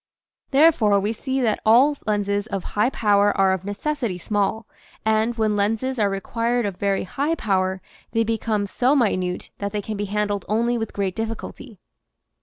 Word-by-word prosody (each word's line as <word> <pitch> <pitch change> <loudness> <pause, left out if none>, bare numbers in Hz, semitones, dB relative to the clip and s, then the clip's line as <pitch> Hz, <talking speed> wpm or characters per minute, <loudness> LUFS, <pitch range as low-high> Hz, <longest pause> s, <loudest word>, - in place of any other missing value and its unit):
Therefore 270 -9 +4
we 205 +3 -1
see 265 +3 -2
that 225 -4 +1
all 255 +7 +5
lenses 205 0 0
of 195 -4 -4
high 210 +4 +2
power 205 -4 +2
are 190 -1 +4
of 190 -1 -3
necessity 210 +1 -3
small, 205 +4 -1 0.4
and 220 +2 +2
when 215 -2 +1
lenses 225 +5 0
are 205 -2 +3
required 230 +4 -1
of 195 -3 -4
very 200 -1 0
high 285 - -1
power 190 - -1 0.3
they 225 0 +2
become 220 -2 -1
so 255 +7 +1
minute 185 -8 0
that 200 0 -3
they 210 - -1
can 215 0 -4
be 205 - -2
handled 205 -1 -1
only 235 +3 +1
with 225 -2 -3
great 195 -2 -2
difficulty. 225 +1 -6
210 Hz, 170 wpm, -23 LUFS, 200-230 Hz, 0.4 s, all